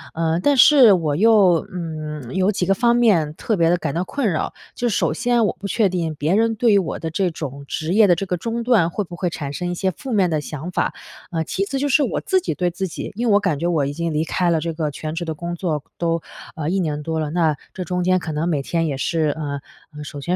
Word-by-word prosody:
呃， 165 +1 0
但 280 +7 +2
是 255 -5 +8
我 160 -5 0
又， 195 -3 +5
嗯， 155 -6 -6
有 190 +2 +2
几 185 -3 -1
个 195 - +3
方 235 +4 +3
面 185 -11 +3
特 220 - -1
别 165 -1 +3
地 175 - +3
感 140 - -3
到 175 +2 0
困 260 +1 -1
扰。 155 - -2 0.2
就 245 - -1
是 200 - -1
首 - - +1
先 240 -2 +2
我 - - 0
不 200 - -5
确 215 +1 +2
定 165 -3 -2
别 155 +6 0
人 225 +1 +2
对 230 +1 +3
于 200 - +6
我 175 -5 -3
的 165 - -4
这 185 +3 +1
种 140 -3 -6
职 160 +2 -2
业 215 0 +6
的 175 - +5
这 195 - -3
个 180 -1 -1
中 230 +5 -3
断 220 -9 +3
会 205 +4 -2
不 175 -1 -9
会 180 +1 -1
产 145 -4 -5
生 180 +2 -3
一 - - -3
些 190 +2 0
负 260 +8 -8
面 195 -5 +3
的 155 -2 0
想 155 +4 -6
法。 - - 0 0.4
呃， 165 -1 -1
其 190 +5 -2
次 270 - -3
就 290 - 0
是 280 +2 +4
我 - - -1
自 380 - +2
己 - - -2
对 180 -1 0
自 190 +2 -3
己 165 - -6
因 235 +3 -1
为 210 - +4
我 205 - +6
感 180 -8 -1
觉 170 - -1
我 155 -5 +1
已 140 - -3
经 170 +2 -2
离 150 - +1
开 175 +1 0
了 165 - +2
这 165 +1 -3
个 155 -1 -2
全 155 +2 -5
职 170 - -3
的 160 - -3
工 170 +3 -5
作 160 -5 -2 0.2
都， 165 -1 0 0.4
呃， 155 -2 -4
1 190 +3 0
年 150 -4 -2
多 160 +1 -2
了， 155 -1 -2
那 160 -3 +2 0.2
这 185 - -4
中 180 0 -2
间 185 +1 +3
可 160 -3 -5
能 155 +3 -1
每 150 -5 0
天 165 +1 -1
也 140 - -2
是 155 +2 0
呃， 145 -2 -3 0.4
首 145 -1 -8
先 175 +5 -1
175 Hz, 295 characters per minute, -21 LUFS, 155-200 Hz, 0.4 s, 是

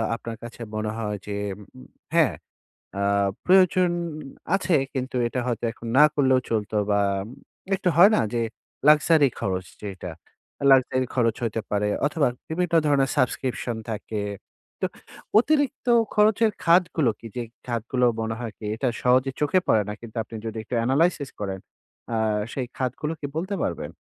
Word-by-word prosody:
আপনার 115 0 -6
কাছে 120 0 -9
মনে 110 0 -2
হয় 105 -2 -3
যে 105 - -3 0.3
উম 130 +5 -15 0.3
হ্যাঁ, 160 -6 +4 0.7
আ - - 0 0.4
প্রয়োজন 185 -1 +5 0.7
আছে, 185 -3 +1 0.2
কিন্তু 130 0 -3
এটা 125 - -3
হয়তো 120 -1 -2
এখন 115 0 -10
না 150 - +10
করলেও 130 -3 +4
চলতো? 110 -1 -1 0.2
বা 100 - +3 0.8
একটু 190 -1 0
হয় 195 +5 +8
না - - +3
যে 120 - +1 0.5
লাক্সারি 150 -1 +6
খরচ 95 -1 -2 0.2
যেইটা? 95 -3 -6 0.6
লাক্সারি 130 -1 +4
খরচ 115 -3 +2
হইতে 115 -1 -1
পারে 105 0 +1 0.2
অথবা 150 0 +1 0.2
বিভিন্ন 170 +1 -1
ধরনের 135 -2 +3
সাবস্ক্রিপশন 125 -3 -1
থাকে। 105 0 -4 0.6
তো - - +2 0.5
অতিরিক্ত 285 +1 +1 0.3
খরচের 215 +1 +4
খাতগুলো 170 -5 +3
কি? - - -14
যে 125 - -2 0.3
খাতগুলো 120 +1 0 0.2
মনে 110 0 -2
হয় 120 -2 -4
কি 110 - -9
এটা 120 +4 -1 0.2
সহজে 130 +2 +3
চোখে 150 +5 +3
পড়ে 110 - +4
না। - - -3
কিন্তু 115 -1 -11
আপনি 115 - -11
যদি 110 0 -4
একটু 120 - -4
এনালাইসিস 140 +2 +2
করেন 95 -2 -3 0.5
আ - - +1 0.4
সেই 130 - -2
খাতগুলো 135 +4 -2
কি 145 - -3
বলতে 190 +5 -2
পারবেন? - - -3
130 Hz, 150 wpm, -25 LUFS, 115-160 Hz, 0.8 s, না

